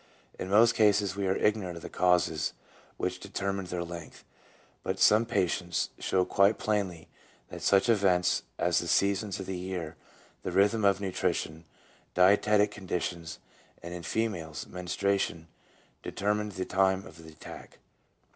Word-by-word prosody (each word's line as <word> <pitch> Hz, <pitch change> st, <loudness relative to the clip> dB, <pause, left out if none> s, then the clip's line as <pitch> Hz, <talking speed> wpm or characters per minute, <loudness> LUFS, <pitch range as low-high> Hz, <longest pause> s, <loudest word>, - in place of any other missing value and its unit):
In 95 Hz, -, -4 dB
most 115 Hz, +4 st, +6 dB
cases 105 Hz, -2 st, +3 dB
we 100 Hz, -1 st, -1 dB
are 95 Hz, -, +2 dB
ignorant 100 Hz, -5 st, 0 dB
of 85 Hz, -, -10 dB
the -, -, -5 dB
causes 90 Hz, -3 st, +1 dB, 0.4 s
which 90 Hz, 0 st, -2 dB
determine 100 Hz, 0 st, -3 dB
their 90 Hz, -1 st, -3 dB
length, 85 Hz, -2 st, -9 dB, 0.6 s
but 95 Hz, -, -3 dB
some 110 Hz, +4 st, +5 dB
patients 90 Hz, -4 st, 0 dB
show 95 Hz, -1 st, +1 dB
quite 100 Hz, +3 st, +3 dB
plainly 100 Hz, -6 st, -2 dB, 0.4 s
that -, -, -8 dB
such 100 Hz, +3 st, +3 dB
events 95 Hz, -6 st, +3 dB, 0.2 s
as -, -, +2 dB
the -, -, -4 dB
seasons 100 Hz, 0 st, +1 dB
of 95 Hz, -, -5 dB
the 95 Hz, -, -4 dB
year, 90 Hz, -4 st, -5 dB, 0.4 s
the -, -, -4 dB
rhythm 105 Hz, +3 st, +3 dB
of 100 Hz, -1 st, +3 dB
nutrition, 85 Hz, -4 st, -2 dB, 0.5 s
dietetic 105 Hz, +3 st, +4 dB
conditions, 90 Hz, -4 st, -4 dB, 0.5 s
and 85 Hz, +1 st, -6 dB
in 90 Hz, -, -6 dB
females 85 Hz, -, -3 dB
menstruation 90 Hz, -1 st, -2 dB, 0.5 s
determine 105 Hz, +1 st, -1 dB
the 95 Hz, -2 st, -4 dB
time 95 Hz, 0 st, +1 dB
of 80 Hz, +1 st, -13 dB
the 80 Hz, -, -11 dB
attack. 75 Hz, -, -12 dB
95 Hz, 145 wpm, -29 LUFS, 90-100 Hz, 0.6 s, most